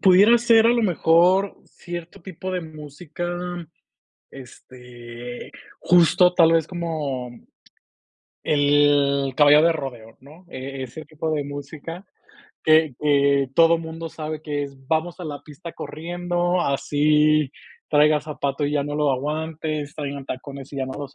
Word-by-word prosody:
pudiera 200 +5 +6
ser, 230 -1 +5
a - - +5
lo 240 -1 +1
mejor, 180 +1 +3
cierto 175 +2 -9
tipo 185 0 -7
de 180 - -1
música, 155 +2 -7 1.0
este, 120 -2 -11 0.3
justo, 180 +1 +4
tal 165 -2 +5
vez, 165 -2 +2
como 155 -8 -4 1.1
el 145 -2 +2
Caballo 150 0 +6
de 170 +1 +4
rodeo, 120 -7 -7
¿no? 150 +7 -16
E 135 -3 -7
ese 130 +5 -8
tipo 155 +1 -5
de 150 -2 -1
música 145 +5 -8 0.6
que 155 -3 +4
que 140 -2 +2
todo 165 +1 +5
mundo 165 0 -7
sabe 155 -1 -6
que 145 -2 -3
es, 140 -1 -11
vamos 165 +2 -1
a - - -6
la 145 -2 -6
pista 155 +3 -10
corriendo, 175 +2 -2
así 150 0 +2 0.4
traiga 150 0 +4
zapato 145 -1 -3
y 145 - -2
ya 145 - +1
no 145 +1 -5
lo 150 -1 +2
aguante, 155 +2 -3
traigan 140 -2 -5
tacones 140 +1 -8
y - - -7
ya 135 - -1
no 130 - -6
los 140 -1 -8
150 Hz, 140 wpm, -22 LUFS, 140-165 Hz, 1.1 s, pudiera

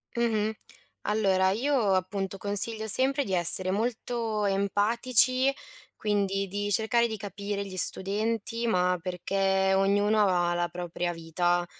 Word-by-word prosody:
Mh-mh. 220 -2 0 0.5
Allora 195 -3 +1
io 230 -1 0
appunto 195 +1 -3
consiglio 215 +3 -2
sempre 270 +6 +2
di 195 - -5
essere 185 +1 +6
molto 225 0 -2
empatici, 235 +6 +2 0.4
quindi 195 -2 -1
di 205 +2 -4
cercare 230 +3 +2
di 220 -1 -5
capire 200 0 -5
gli 190 -1 -9
studenti, 220 +5 -1
ma 180 -3 +1
perché 190 +2 -1
ognuno 205 +2 +2
ha 175 -2 +1
la 175 0 -1
propria 175 0 -4
vita. 175 +1 -1
200 Hz, 120 wpm, -27 LUFS, 190-220 Hz, 0.5 s, essere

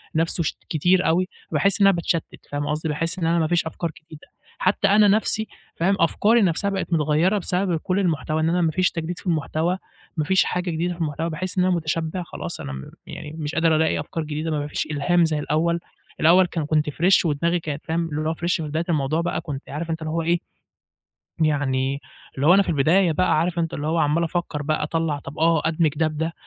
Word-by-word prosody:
نفسه 165 +1 +1
ش 155 - -2
كتير 180 +4 +2
أوي 180 +3 +2 0.2
فباحس 200 +1 +2
إن 200 - +7
أنا 195 - +5
باتشتت 170 -1 -3
فاهم 145 0 -2
قصدي، 155 +1 -2
باحس 165 +5 -1
إن 170 - -1
أنا 170 +1 +2
ما 160 - +1
فيش 170 0 +1
أفكار 160 +1 -3
جديدة، 155 -2 -14 0.3
حتى 200 - +2
أنا 205 +1 +5
نفسي 215 +1 +1 0.3
فاهم 190 +4 +2
أفكاري 215 +7 +3
نفسها 190 +1 +1
بقت 195 -3 -3
متغيرة 160 +5 +2
بسبب 180 -2 0
كل 185 +4 -1
المحتوى 155 -4 0
إن 160 - +2
أنا 175 +1 +1
ما 165 -2 +2
فيش 185 +3 +1
تجديد 170 +1 -4
في - - -15
المحتوى 165 +2 0 0.4
ما 155 - +1
فيش 190 +4 +4
حاجة 180 0 -2
جديدة 170 +2 -1
في 170 - -8
المحتوى 160 +1 -2
باحس 185 +4 -4
إن 180 - +4
أنا 185 - +2
متشبع 165 +2 -2
خلاص 85 - -7
أنا 70 - -6
م 65 0 -8 0.2
يعني 150 -2 -8
مش 150 +1 -4
قادر 165 -1 +3
ألاقي 160 -1 +2
أفكار 155 +2 -4
جديدة 155 +1 -3
م - - 0
ما 145 -1 -2
فيش 150 - -3
إلهام 170 +4 +2
زي 155 -2 -1
الأول، 165 +3 0 0.4
الأول 180 +4 +6
كان 165 -3 -3
كنت 150 0 +1
fresh 175 +6 +3
ودماغي 170 +3 +1
كانت 150 -2 -6
فاهم 165 +1 -1
اللي 155 +1 -2
هو - - 0
fresh 170 +2 0
في 165 - -3
بداية 155 +2 -2
الموضوع 155 0 +1
بقى 170 - -2
كنت 140 -4 -7
عارف 165 +3 -5
أنت 160 0 -3
اللي 155 0 -3
هو 165 +1 0
إيه، 170 +1 +1 1.0
يعني 140 -3 +1 0.4
اللي 135 +2 0
هو 175 - +8
أنا 200 - +6
في - - -8
البداية 165 +4 +3
بقى 180 0 +2
عارف 170 +2 0
أنت 165 -1 -1
اللي 145 - -4
هو 165 +2 +1
عَمَّال 155 +2 +2
أفكر 170 -3 -3
بقى 155 +1 -1
أطلَّع 155 -1 -1
طَب 140 0 -10
آه 165 -1 +3
أدمج 165 -1 +2
ده 160 +1 +2
بده 160 +2 -3
165 Hz, 225 wpm, -23 LUFS, 155-175 Hz, 1.0 s, هو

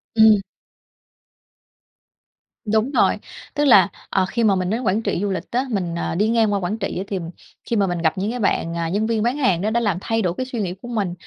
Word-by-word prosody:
Ừm. 220 -2 +6 2.2
Đúng 220 +4 +1
rồi. - - +3 0.4
Tức 295 0 +1
là, 200 -9 +7 0.2
ờ, 190 -1 +2
khi 235 - -1
mà 205 -3 +4
mình 185 -1 -1
đến 225 +5 -1
Quảng 210 0 +1
Trị 220 - -1
du 205 - 0
lịch 185 -1 -5
á, 250 +3 0
mình, 180 -7 -2
ờ, 170 - -2
đi 210 +5 +2
ngang 225 -2 +2
qua 200 - +1
Quảng 185 +4 -2
Trị 195 -3 -3
thì 195 - -2 0.5
khi 235 - +1
mà 200 -3 +2
mình 175 -1 -2
gặp 160 +1 +1
những 200 +4 -1
cái 250 - -4
bạn, 170 -5 0
ờ, 170 -1 -1
nhân 205 +5 0
viên 225 -1 0
bán 245 +5 0
hàng 190 - +2
đó 210 - 0
đã 235 +2 +1
làm 205 -7 0
thay 225 +2 0
đổi 180 -4 0
cái 255 - -2
suy 245 -4 -4
nghĩ 180 -2 -2
của 240 - -9
mình. 205 -7 -2
210 Hz, 240 wpm, -21 LUFS, 185-230 Hz, 2.2 s, là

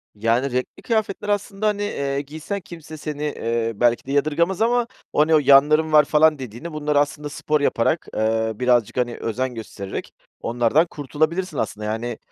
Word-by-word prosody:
Yani, 115 +5 +1
renkli 125 +1 -3
kıyafetler, 215 -3 -1
aslında, 205 0 -1
hani, 205 -1 0
eee, 140 -8 -2
giysen 155 +8 -6
kimse 160 -3 -10
seni, 150 -1 -5
eee, 115 -5 -1
belki 120 +2 +2
de 135 - -5
yadırgamız 160 +7 +1
ama 240 +1 +2 0.3
“o 150 +1 +4
ne 160 - +4
o, - - +6
yanların 150 +3 +5
var“ 150 -1 +7
falan 155 0 +4
dediğini, 130 +7 -7
bunlar 150 -1 -1
aslında 145 +1 0
spor 150 0 -1
yaparak, 145 +4 +1
eee, 110 +1 +1
birazcık, 120 -1 +1
hani, 120 -1 0
özen 125 +2 -3
göstererek 100 -3 -7 0.3
onlardan 120 +7 +2
kurtulabilirsin 155 +4 -2
aslında. 105 0 -3
Yani, 110 +2 -3
145 Hz, 165 wpm, -22 LUFS, 120-160 Hz, 0.3 s, var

